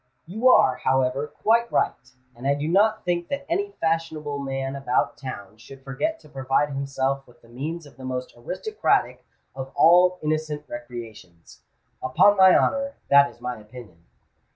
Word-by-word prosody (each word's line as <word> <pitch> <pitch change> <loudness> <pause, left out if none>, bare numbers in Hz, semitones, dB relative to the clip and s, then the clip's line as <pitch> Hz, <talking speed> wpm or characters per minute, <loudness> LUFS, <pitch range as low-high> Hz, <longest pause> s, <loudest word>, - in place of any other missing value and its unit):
"You 220 +9 +2
are, - - +5
however, 130 +2 0
quite 235 +6 +1
right; 130 - -1 0.2
and 125 +3 -5
I 140 - +3
do 145 +2 -3
not 215 +5 +2
think 175 -1 -1
that 280 0 -4
any 400 +4 -2
fashionable 160 -3 -2
man 135 0 -4
about 135 -2 0
town 110 -6 -8
should 135 +4 -14
forget 225 - -3
to - - -17
provide 135 0 0
himself 135 0 -2
with 120 - -22
the - - -18
means 150 +7 -5
of 145 - -17
the 130 - -11
most 130 0 -5
aristocratic 185 - -1 0.3
of 135 0 -7
all 180 +2 +5
innocent 155 -1 -2
recreations. 115 -8 -10 0.4
Upon 130 +11 +4
my 190 -1 +7
honour, 275 0 0 0.2
that 140 0 +7
is - - -18
my 125 0 -5
opinion." 105 -5 -14
140 Hz, 160 wpm, -24 LUFS, 130-175 Hz, 0.4 s, my